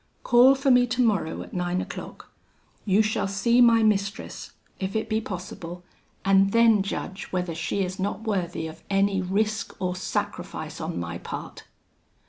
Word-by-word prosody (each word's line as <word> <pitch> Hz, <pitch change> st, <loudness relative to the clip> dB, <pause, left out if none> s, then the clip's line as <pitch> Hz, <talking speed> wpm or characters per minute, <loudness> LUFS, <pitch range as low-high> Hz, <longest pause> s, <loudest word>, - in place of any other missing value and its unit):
Call 250 Hz, +3 st, +6 dB
for 275 Hz, 0 st, +2 dB
me 245 Hz, 0 st, +5 dB
tomorrow 225 Hz, -9 st, 0 dB
at -, -, -14 dB
nine 180 Hz, 0 st, -1 dB
o'clock: -, -, -8 dB, 0.5 s
you 205 Hz, +1 st, +4 dB
shall 215 Hz, -2 st, 0 dB
see 235 Hz, +5 st, +3 dB
my 230 Hz, -2 st, +6 dB
mistress, 200 Hz, -2 st, -1 dB, 0.3 s
if 190 Hz, +1 st, -3 dB
it 220 Hz, -, -1 dB
be 220 Hz, 0 st, 0 dB
possible, 180 Hz, -3 st, -7 dB, 0.4 s
and 195 Hz, 0 st, +4 dB
then 230 Hz, -3 st, +5 dB
judge 195 Hz, 0 st, -4 dB
whether 180 Hz, -2 st, -3 dB
she 165 Hz, +5 st, -1 dB
is 185 Hz, +1 st, -5 dB
not 200 Hz, +3 st, -2 dB
worthy 185 Hz, -7 st, -2 dB
of 160 Hz, 0 st, -9 dB
any 195 Hz, -1 st, +2 dB
risk 210 Hz, +4 st, -1 dB
or 180 Hz, -1 st, -1 dB
sacrifice 185 Hz, -, -4 dB
on -, -, -3 dB
my 85 Hz, 0 st, -5 dB
part.' -, -, -7 dB
195 Hz, 155 wpm, -25 LUFS, 185-220 Hz, 0.5 s, Call